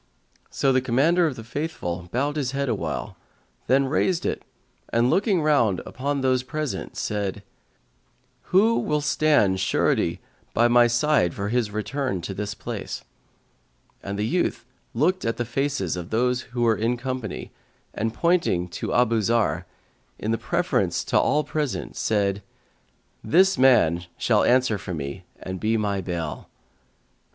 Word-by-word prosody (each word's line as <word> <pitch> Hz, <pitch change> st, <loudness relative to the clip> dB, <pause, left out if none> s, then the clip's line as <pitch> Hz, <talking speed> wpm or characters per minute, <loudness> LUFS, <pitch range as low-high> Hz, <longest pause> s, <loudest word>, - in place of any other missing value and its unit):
So 135 Hz, -, +1 dB
the 130 Hz, -, +3 dB
Commander 155 Hz, +8 st, +3 dB
of 145 Hz, -, -3 dB
the 115 Hz, -, -8 dB
Faithful 95 Hz, -, -4 dB
bowed 140 Hz, +6 st, 0 dB
his 135 Hz, -4 st, -2 dB
head 140 Hz, -1 st, -1 dB
awhile, 110 Hz, -4 st, -3 dB, 0.5 s
then 135 Hz, +2 st, +4 dB
raised 165 Hz, +5 st, 0 dB
it -, -, -1 dB, 0.5 s
and 120 Hz, +2 st, +2 dB
looking 195 Hz, -4 st, +2 dB
round 120 Hz, -11 st, +3 dB
upon 140 Hz, +2 st, -2 dB
those 130 Hz, -1 st, +2 dB
present, 150 Hz, +2 st, -4 dB
said, 105 Hz, -1 st, -2 dB, 1.0 s
"Who 220 Hz, +5 st, +4 dB
will 150 Hz, 0 st, 0 dB
stand 145 Hz, -10 st, +3 dB
surety 90 Hz, -, +1 dB, 0.4 s
by 120 Hz, +1 st, +5 dB
me 120 Hz, 0 st, +5 dB
for 115 Hz, -, +1 dB
his 120 Hz, -2 st, +1 dB
return 110 Hz, +1 st, -2 dB
to 95 Hz, -, -5 dB
this 105 Hz, +1 st, -4 dB
place?" -, -, -6 dB, 1.0 s
And 100 Hz, 0 st, -5 dB
the 105 Hz, -, 0 dB
youth 175 Hz, -3 st, -1 dB, 0.3 s
looked 180 Hz, +9 st, +1 dB
at 115 Hz, 0 st, -1 dB
the 120 Hz, -, -1 dB
faces 120 Hz, -, -1 dB
of 90 Hz, -1 st, -6 dB
those 125 Hz, +2 st, +1 dB
who 120 Hz, 0 st, -2 dB
were 115 Hz, -2 st, +4 dB
in 115 Hz, +3 st, 0 dB
company 130 Hz, -4 st, -5 dB, 0.4 s
and 110 Hz, +2 st, -1 dB
pointing 140 Hz, -, +1 dB
to -, -, -4 dB
Abu 115 Hz, -2 st, +3 dB
Zarr,[FN#149] 115 Hz, +1 st, +1 dB, 0.5 s
in 110 Hz, +2 st, -1 dB
preference -, -, 0 dB
to -, -, +2 dB
all 150 Hz, +1 st, +2 dB
present, 150 Hz, -4 st, -3 dB
said, 100 Hz, -2 st, 0 dB, 0.8 s
"This 190 Hz, +3 st, +4 dB
man 90 Hz, -10 st, +4 dB
shall -, -, +2 dB
answer 125 Hz, -4 st, +3 dB
for 90 Hz, -2 st, -5 dB
me 75 Hz, +5 st, -6 dB
and 95 Hz, 0 st, -6 dB
be 110 Hz, +3 st, +1 dB
my 100 Hz, -2 st, -1 dB
bail." 85 Hz, -3 st, -5 dB
120 Hz, 145 wpm, -24 LUFS, 100-145 Hz, 1.0 s, by